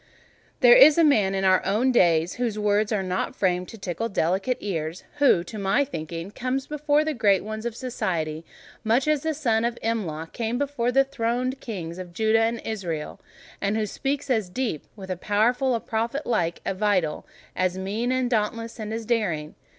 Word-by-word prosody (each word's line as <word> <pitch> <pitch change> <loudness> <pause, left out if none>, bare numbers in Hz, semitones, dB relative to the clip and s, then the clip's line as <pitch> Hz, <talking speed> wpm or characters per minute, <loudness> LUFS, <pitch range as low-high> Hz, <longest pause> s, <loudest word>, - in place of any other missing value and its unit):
There - - +8
is 310 -12 +8
a 335 - +5
man 210 -10 +3
in 195 - -1
our 185 -1 +4
own 220 +7 +2
days 170 -6 +3
whose 230 -4 -1
words 210 +1 +1
are 205 -3 0
not 185 0 -2
framed 180 -1 0
to 225 - -10
tickle 195 +4 -3
delicate 190 +6 0
ears: 165 -4 -4
who, 275 -12 +4
to 210 +4 -8
my 200 +8 +2
thinking, 165 - -6
comes 255 +3 -2
before 300 0 +1
the 310 - 0
great 205 -7 +3
ones 215 +2 -4
of 235 - -5
society, 170 -11 -3 0.4
much 235 +6 +2
as 305 -2 +2
the 315 0 -1
son 230 -7 +1
of 235 0 -1
Imlah 170 -9 -3
came 230 0 -2
before 270 -3 -1
the 270 +2 +5
throned 255 0 -2
Kings 180 -8 -6
of 180 -2 -8
Judah 220 +3 +2
and 230 0 0
Israel; 175 -8 -4 0.4
and 200 +2 0
who 215 - 0
speaks 275 +7 -3
truth 255 -4 +2
as 195 -4 -8
deep, 225 - -3
with 190 -3 -8
a 185 - -2
power 210 +5 +2
as 250 -2 0
prophet 230 +6 -2
like 170 -8 0
and 195 - -2
as - - -15
vital—a 185 -2 -1
mien 210 +6 -2
as 255 -1 +1
dauntless 230 +1 -2
and 215 -1 -5
as 225 0 -4
daring. 185 -10 -1
220 Hz, 195 wpm, -25 LUFS, 185-250 Hz, 0.4 s, There